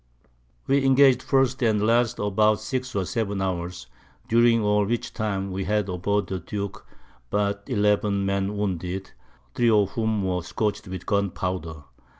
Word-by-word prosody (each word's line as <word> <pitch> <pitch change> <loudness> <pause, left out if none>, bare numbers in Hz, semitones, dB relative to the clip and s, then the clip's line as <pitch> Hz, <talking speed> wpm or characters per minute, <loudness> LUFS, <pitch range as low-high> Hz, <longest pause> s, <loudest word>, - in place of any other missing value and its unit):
We 140 0 +2
engag'd 135 -1 +5
first 135 0 +1
and 110 -3 +2
last 115 +1 +2
about 105 +1 +2
six 130 +3 -4
or 95 -2 0
seven 100 -1 -2
Hours, 90 -5 -3 0.4
during 115 -1 +4
all 105 0 +3
which 115 +4 -2
time 100 -3 -2
we 95 0 -3
had 105 0 0
aboard 100 +3 0
the 95 - -4
Duke 100 +2 -6 0.4
but 100 0 -1
eleven 105 -3 +1
Men 100 +1 -1
wounded, 95 -1 -3 0.4
3 120 - +2
of 105 -3 +3
whom 110 -3 -1
were 90 -1 -1
scorch'd 100 +4 -3
with 95 -1 -7
Gun 100 -1 +1
powder. 85 -4 -4
105 Hz, 150 wpm, -25 LUFS, 95-110 Hz, 0.4 s, engag'd